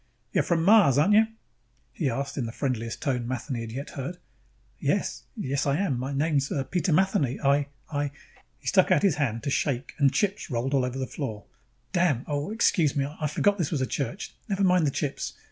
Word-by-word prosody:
"You're - - +3
from 165 -2 +1
Mars, 200 - +6
aren't 180 +8 +4
you?" 220 +1 +6 0.7
he 150 - 0
asked 135 +3 -3
in 125 -5 -2
the - - -5
friendliest 115 -3 -3
tone 125 -5 -1
Matheny 130 0 -3
had 115 -1 -6
yet 135 +5 -5
heard. 140 +6 -5 0.6
"Yes. - - -1
Yes, 140 -7 -1
I 140 +1 +2
am. 195 -5 +1
M 120 - -2
my 130 +3 -3
name's 140 -1 +1 0.2
Peter 180 0 +1
Matheny. 155 -7 +2
I, 140 0 +2 0.2
I 145 -1 -1 0.3
" - - -30
He - - -25
stuck - - +4
out - - +4
his 190 -8 +3
hand 115 -6 -1
to 140 - -1
shake 135 -2 -1
and 140 -2 +5
chips 200 +1 -1
rolled 125 +1 -1
over 130 -1 +1
the 130 - -1
floor. 115 -6 -5 0.5
"Damn! 170 -9 +2
Oh, 145 +3 -2
excuse 180 - +2
me, 140 -1 +1
I 150 +2 -3
forgot 205 +7 +1
this 160 - 0
was 150 -5 -1
a - - +2
church. 140 +9 -4 0.2
Never 200 0 0
mind 180 -4 +4
the - - +3
chips. 140 0 -3
140 Hz, 210 wpm, -27 LUFS, 130-170 Hz, 0.7 s, Mars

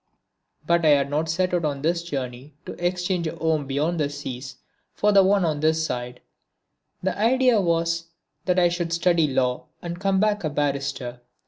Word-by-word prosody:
But 170 +1 +2
I 155 - +5
had 140 0 -1
not 155 +2 0
set 180 +3 0
out 175 -1 +1
on 145 -2 -2
this 170 +2 +1
journey 135 -3 -6
to - - -6
exchange 180 -1 0
a 160 - -4
home 160 -3 0
beyond 150 +5 -1
the 145 -2 +1
seas 135 -2 -7 0.4
for 210 - +2
the 200 -1 +7
one 195 -1 +3
on 155 -3 -1
this 160 +1 +2
side. 125 -3 -5 0.8
The 190 - 0
idea 245 +1 +3
was 165 -1 0 0.4
that 180 -1 +1
I 175 -1 +5
should 175 -1 -2
study 170 -2 +3
Law 125 -2 -1
and 170 0 -6
come 195 0 +1
back 210 -1 +1
a 155 - 0
barrister. 140 -4 -2
165 Hz, 185 wpm, -24 LUFS, 140-180 Hz, 0.8 s, the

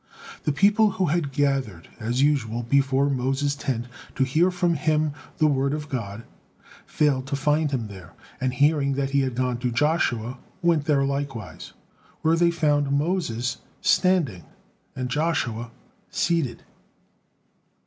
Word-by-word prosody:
The 150 - +2
people 205 +7 +4
who 185 - +2
had 155 -2 0
gathered 135 - -1
as 120 +4 0
usual 120 -6 +1
before 135 +2 +2
Moses' 135 +1 0
tent 130 -4 -3 0.3
to 135 - +2
hear 155 +8 +3
from 175 -1 +1
him 155 0 +1 0.3
the 155 - +3
word 140 -1 +2
of 150 0 -6
God, 115 -4 -4 0.6
failed 135 -3 +1
to 140 - -1
find 150 +2 +1
him 130 -5 -2
there, 95 -4 -11 0.3
and 130 0 0
hearing 140 +1 +2
that 135 0 -1
he 140 - +3
had 130 -3 -1
gone 125 -1 -1
to 125 0 -1
Joshua, 125 -3 0 0.2
went 165 -4 +3
there 145 -3 +3
likewise, 135 -7 -4 0.5
where 160 +1 +4
they 170 +1 +4
found 150 -4 +1
Moses 140 -6 0 0.2
standing 165 - +2 0.5
and 130 -1 -3
Joshua 125 -6 -1 0.4
seated. 165 -9 -1
140 Hz, 140 wpm, -24 LUFS, 125-155 Hz, 0.6 s, people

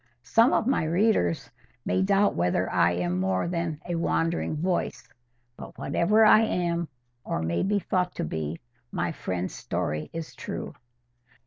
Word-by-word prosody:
—Some 225 - +4
of - - +2
my 265 -8 +2
readers 165 - +1 0.3
may 185 - +1
doubt 200 +1 +3
whether 90 +1 +1
I 85 +1 +3
am 90 +1 -1
more 95 - 0
than 170 -3 -2
"a 175 - -2
wandering 165 -1 0
voice," 175 -6 -2 0.5
but - - -10
whatever 210 +10 +3
I 215 - +8
am, 170 -5 0 0.4
or 80 - -2
may 85 +1 0
be 205 +2 +1
thought 180 -2 -1
to - - -2
be, 80 +1 -3 0.3
my - - -1
friend's 90 0 -4
story 75 0 -3
is 165 -1 -6
true. - - -6
165 Hz, 150 wpm, -27 LUFS, -, 0.5 s, I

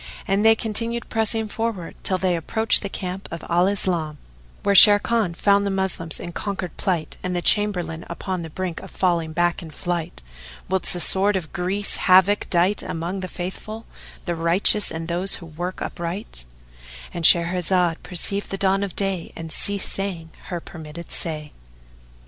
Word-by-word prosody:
And 195 +2 +2
they 225 0 +7
continued 230 +2 -2
pressing 220 0 0
forward 215 -5 -3
till 185 - -1
they 185 -1 +1
approached 220 +7 +2
the 200 - -4
camp 185 0 -5
of 170 - -7
Al 175 +2 +3
Islam, 175 -6 -1 0.5
where 200 - +3
Sharrkan 205 -1 +6
found 200 +2 +3
the 200 - 0
Moslem 190 -4 -1
in 175 - -6
conquered 190 -2 -4
plight 175 -5 -2
and 185 0 -3
the 175 - 0
Chamberlain 180 -6 +2
upon 180 +1 -4
the 165 - -6
brink 180 +1 -4
of - - -10
falling 170 -4 0
back 175 +1 +1
in 165 - -9
flight, 165 - -4 0.4
whilst 190 0 0
the 175 - -3
sword 195 +3 +3
of 170 -5 -4
Greece 190 +3 0
havoc 190 +2 +4
dight 180 +3 +2
among 170 +4 -4
the 185 - -4
Faithful, 195 +5 -6 0.4
the 175 - -1
righteous 170 +5 +3
and 160 0 -5
those 180 +3 +1
who 175 - -9
work 175 +3 -5
upright,—And - - -8
Shahrazad 175 0 +4
perceived 200 +3 -2
the 195 - -3
dawn 195 0 +2
of 200 -3 -4
day 195 -4 -2
and 165 -1 -6
ceased 200 +3 +1
saying 180 -5 -4
her 175 - -4
permitted 160 0 -10
say. 150 -2 -3
180 Hz, 165 wpm, -23 LUFS, 170-200 Hz, 0.5 s, they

